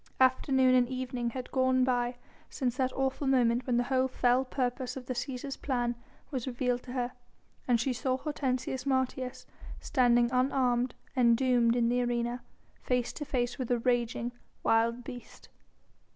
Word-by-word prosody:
Afternoon 260 0 +4
and 250 -1 +4
evening 255 -2 -3
had 250 +1 -6
gone 260 -1 +3
by 245 -1 +1 0.3
since 250 -3 -2
that 260 -1 +1
awful 270 +1 -1
moment 245 -2 +2
when 245 -2 +2
the 245 - +3
whole 260 +1 +1
fell 250 0 +2
purpose 255 0 -2
of 255 - -7
the 255 - -3
Cæsar's 255 +2 -4
plan 245 -3 -1 0.4
was 260 -3 -3
revealed 245 -1 -1
to 250 - -9
her, 250 -1 -1 0.6
and 240 -2 +3
she 255 +3 0
saw 255 +1 -1
Hortensius 260 -2 -2
Martius 260 -1 -1 0.3
standing 240 -1 +3
unarmed 255 -1 +1 0.2
and 235 -3 +5
doomed 245 -2 +3
in 235 -1 +2
the 245 +1 +2
arena, 240 0 -1 0.4
face 245 -1 0
to 295 - -5
face 245 -2 -1
with 255 - -3
a 245 - +3
raging, 240 0 0 0.3
wild 230 +2 +2
beast. 245 -1 -10
250 Hz, 160 wpm, -30 LUFS, 240-260 Hz, 0.6 s, and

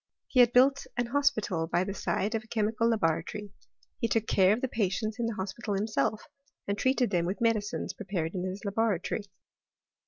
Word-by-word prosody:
He 255 - 0
had 240 -1 +7
built 270 +3 +4
an 245 - +1
hospital 235 - +1
by 175 +2 +1
the 195 +1 -4
side 205 +2 -1
of 225 -1 -1
a - - -19
chemical 225 +1 +1
laboratory: 205 0 -1 0.5
he 230 - +1
took 225 -1 +1
care 190 -2 +4
of 220 +4 +1
the 260 - 0
patients 215 0 -1
in 235 - 0
the 230 - -3
hospital 200 +2 -3
himself; 210 -2 0 0.4
and 200 - 0
treated 255 0 +1
them 175 -2 +1
with 190 - -3
medicines 225 -3 0
prepared 180 -6 -3
in 180 -2 -3
his 190 +4 -5
laboratory. 205 -1 0
215 Hz, 185 wpm, -29 LUFS, 195-230 Hz, 0.5 s, had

